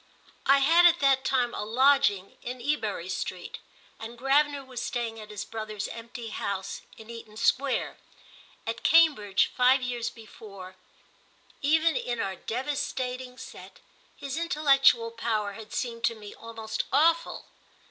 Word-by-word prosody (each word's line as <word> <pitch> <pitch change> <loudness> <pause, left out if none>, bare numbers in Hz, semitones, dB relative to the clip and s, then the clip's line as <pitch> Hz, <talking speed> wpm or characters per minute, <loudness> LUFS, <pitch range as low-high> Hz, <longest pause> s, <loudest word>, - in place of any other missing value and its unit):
I 275 - +7
had 330 +6 +6
at 345 0 +3
that 270 -1 +4
time 250 -2 +1
a - - -3
lodging 250 -4 +3
in 250 +1 -6
Ebury 225 - -2
Street, 185 -1 -5 0.4
and 230 +2 -8
Gravener 280 +2 +2
was 255 -2 -6
staying 235 -2 -3
at 215 -1 -10
his 210 -2 -6
brother's 215 -2 -5
empty 230 0 -8
house 195 -2 -4 0.2
in 220 +1 -11
Eaton 225 -2 -10
Square. 260 +4 +1 0.7
At 225 +1 -4
Cambridge, 290 - +4
five 255 +1 +4
years 240 -2 -2
before, 205 -5 -12 0.9
even 315 +3 +3
in 240 -1 -2
our 195 -2 -2
devastating 255 +1 -4
set, - - -11 0.4
his 280 +1 -5
intellectual 275 -8 +3
power 220 -3 -1
had 215 +1 -11
seemed 230 -2 -4
to 230 - +1
me 210 -2 -10
almost 225 -1 -5
awful. 330 +4 +2
240 Hz, 135 wpm, -27 LUFS, 220-275 Hz, 0.9 s, I